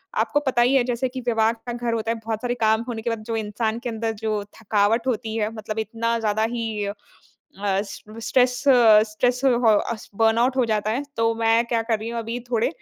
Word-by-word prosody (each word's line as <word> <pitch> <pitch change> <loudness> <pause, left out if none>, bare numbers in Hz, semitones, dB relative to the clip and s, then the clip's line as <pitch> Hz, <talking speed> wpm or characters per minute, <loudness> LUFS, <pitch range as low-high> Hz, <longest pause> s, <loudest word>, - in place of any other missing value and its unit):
आपको 290 - +1
पता 245 -2 +2
ही 250 +3 +4
है, 265 - +4
जैसे 245 +1 -1
कि 255 0 -6
विवाह 225 -1 +3
का 235 +1 -8
घर 240 -1 -2
होता 225 0 -1
है, 230 - -2
बहुत 220 -1 -3
सारे 245 0 -1
काम 220 +1 +3
होने 225 -2 -4
के 235 - -2
बाद, 225 -2 -3
जो 230 - -2
इंसान 220 +1 -2
के 245 - -4
अंदर 225 0 -2
जो 215 -2 -1 0.2
थकावट 220 +3 +1
होती 225 -2 -2
है, 215 0 -1
मतलब 215 0 -5
इतना 230 +1 -1
ज़्यादा 215 0 0
ही 220 -3 -2 0.8
अस 195 +1 0 0.4
स्ट्रेस 250 -1 +3 0.5
स्ट्रेस 245 +4 0
हो 240 -3 +4 0.2
अस 220 -2 -7
बर्नआउट 230 +4 +3
हो 250 - +3
जाता 215 -1 0
है। 260 +6 -1
तो 230 0 +2
मैं 225 +1 +2
क्या 230 -1 +1
कर 225 -1 0
रही 225 +2 -5
हूँ, 235 - -3
अभी 230 +2 -4
थोड़े 230 -1 +2
230 Hz, 215 wpm, -23 LUFS, 220-240 Hz, 0.8 s, ही